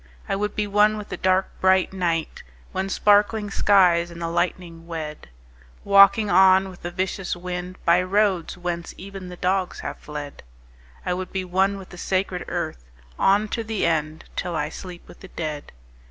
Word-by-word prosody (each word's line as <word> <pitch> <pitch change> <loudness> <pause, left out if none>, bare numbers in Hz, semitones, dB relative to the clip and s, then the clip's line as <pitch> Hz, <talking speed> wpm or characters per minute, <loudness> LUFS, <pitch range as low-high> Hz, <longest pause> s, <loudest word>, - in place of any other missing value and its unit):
I - - 0
would 210 +1 -2
be 210 - 0
one 210 +1 +3
with 210 -1 -8
the - - -4
dark 185 0 +1
bright 190 0 +3
night 170 -4 -2 0.3
When 190 +1 -2
sparkling 205 +1 +3
skies 180 -5 +4
and 170 0 -10
the 165 -1 -3
lightning 170 -1 -2
wed— 155 - -6 0.5
Walking 200 +2 +6
on 190 0 +5
with 185 - -13
the 175 - -4
vicious 185 +1 -3
wind 180 +1 -6
By 170 +2 +5
roads 190 -2 +1
whence 175 -1 -4
even 195 -1 -8
the 180 - -9
dogs 185 0 -1
have - - -6
fled. 150 -1 -8 0.6
I 180 - 0
would 185 0 -5
be 190 -1 -3
one 190 +2 +1
with 190 -1 -11
the 175 - -11
sacred 185 -1 -1
earth - - -4 0.3
On 205 +2 +3
to 230 - -2
the 220 -2 -1
end, 155 -1 -1
till 175 -1 -3
I 150 -1 -1
sleep 175 +1 -10
with - - -15
the 190 - -11
dead. 155 -4 -5
185 Hz, 180 wpm, -23 LUFS, 170-195 Hz, 0.6 s, Walking